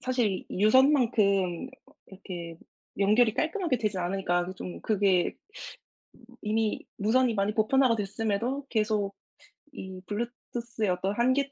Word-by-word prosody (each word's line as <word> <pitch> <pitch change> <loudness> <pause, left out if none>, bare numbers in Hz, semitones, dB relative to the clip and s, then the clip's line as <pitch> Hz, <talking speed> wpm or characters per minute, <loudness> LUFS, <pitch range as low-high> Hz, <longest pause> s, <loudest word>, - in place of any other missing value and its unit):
사실 245 -7 0
유선만큼 215 - +3 0.4
이렇게 175 -4 -8 0.4
연결이 215 +3 +4
깔끔하게 325 - 0
되지 210 -4 -1
않으니까 175 -1 0
그게 185 +1 -7
좀 180 -1 -7
그게 195 -4 +2
음 415 - -11 0.9
이미 215 0 -1
무선이 230 +3 +2
많이 200 0 0
보편화가 230 +2 +3
됐음에도 225 +6 -2
계속 210 -3 0 0.6
이 190 -8 -8
블루투스의 235 0 -4
어떤 185 +3 -1
한계 260 +4 +1
215 Hz, 285 characters per minute, -28 LUFS, 195-245 Hz, 0.9 s, 연결이